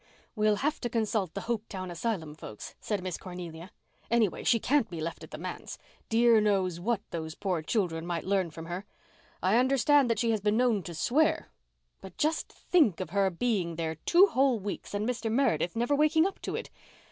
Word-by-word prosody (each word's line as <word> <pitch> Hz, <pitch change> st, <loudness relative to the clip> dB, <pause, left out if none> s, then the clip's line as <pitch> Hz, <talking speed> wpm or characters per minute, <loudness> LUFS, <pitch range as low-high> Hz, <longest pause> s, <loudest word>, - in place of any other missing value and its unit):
"We'll 215 Hz, -1 st, +3 dB
have 295 Hz, +8 st, -1 dB
to 240 Hz, -, -2 dB
consult 215 Hz, -6 st, -1 dB
the -, -, -3 dB
Hopetown 210 Hz, -5 st, -4 dB
asylum 170 Hz, -4 st, -3 dB
folks," 110 Hz, -8 st, -9 dB
said 205 Hz, -4 st, -3 dB
Miss 185 Hz, -2 st, -4 dB
Cornelia. 175 Hz, -1 st, -8 dB, 0.4 s
"Anyway, 225 Hz, -5 st, +1 dB
she 230 Hz, -, +3 dB
can't 260 Hz, -1 st, +2 dB
be 170 Hz, -, -6 dB
left 165 Hz, +1 st, -5 dB
at -, -, -10 dB
the -, -, -7 dB
manse. -, -, -6 dB, 0.3 s
Dear 230 Hz, -1 st, +5 dB
knows 190 Hz, -5 st, +1 dB
what 215 Hz, +3 st, 0 dB
those 160 Hz, -1 st, -5 dB
poor 185 Hz, -5 st, -1 dB
children 165 Hz, -2 st, -1 dB
might 170 Hz, -2 st, -2 dB
learn 190 Hz, -2 st, +1 dB
from 165 Hz, +1 st, -9 dB
her. 180 Hz, +4 st, -6 dB, 0.6 s
I 190 Hz, +5 st, +4 dB
understand 270 Hz, +1 st, +4 dB
that 230 Hz, -, +1 dB
she 230 Hz, -1 st, +1 dB
has 215 Hz, -2 st, 0 dB
been 210 Hz, +2 st, +2 dB
known 240 Hz, -5 st, +3 dB
to 170 Hz, -, -6 dB
swear. 295 Hz, -, +1 dB, 0.5 s
But 190 Hz, -2 st, -11 dB
just 310 Hz, +1 st, 0 dB
think 295 Hz, -, +2 dB
of 185 Hz, -4 st, -5 dB
her 195 Hz, 0 st, +2 dB
being 185 Hz, -3 st, -1 dB
there 160 Hz, -1 st, -2 dB
two 345 Hz, -, +5 dB
whole 265 Hz, -, +2 dB
weeks 205 Hz, +1 st, -5 dB
and 210 Hz, +2 st, -1 dB
Mr 230 Hz, -3 st, -2 dB
Meredith 200 Hz, -, +1 dB
never 240 Hz, +5 st, +1 dB
waking 310 Hz, +3 st, +4 dB
up 390 Hz, -, -3 dB
to -, -, -3 dB
it! -, -, -5 dB
210 Hz, 195 wpm, -29 LUFS, 175-240 Hz, 0.6 s, Dear